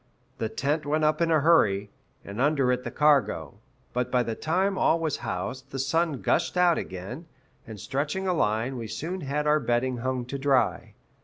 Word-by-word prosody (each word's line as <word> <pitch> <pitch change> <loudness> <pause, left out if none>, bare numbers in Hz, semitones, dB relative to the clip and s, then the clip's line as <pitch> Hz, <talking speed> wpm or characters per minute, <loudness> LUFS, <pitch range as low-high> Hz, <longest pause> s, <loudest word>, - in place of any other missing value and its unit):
The 110 - -1
tent 145 +6 -1
went 155 +2 0
up 155 +2 +2
in 165 - +2
a 160 -2 +3
hurry, 105 -11 +3 0.3
and 100 +5 -5
under 140 -3 +3
it 125 0 -1
the - - -4
cargo; 135 - +1 0.3
but 125 0 -1
by 125 -1 +2
the 115 - -3
time 185 - 0
all 165 -3 +2
was 160 -3 -1
housed 120 +5 -5
the 135 - -6
sun 150 +2 0
gushed - - +1
out 175 -2 +4
again, 95 - -7 0.4
and, 110 -2 -8
stretching 145 - -2
a 180 - +2
line, 115 -2 0
we 115 -2 -5
soon 175 - -4
had 145 +2 -2
our 150 0 +4
bedding 125 0 0
hung 130 0 -2
to 140 +3 -5
dry. 135 -5 +1
135 Hz, 190 wpm, -26 LUFS, 120-155 Hz, 0.4 s, out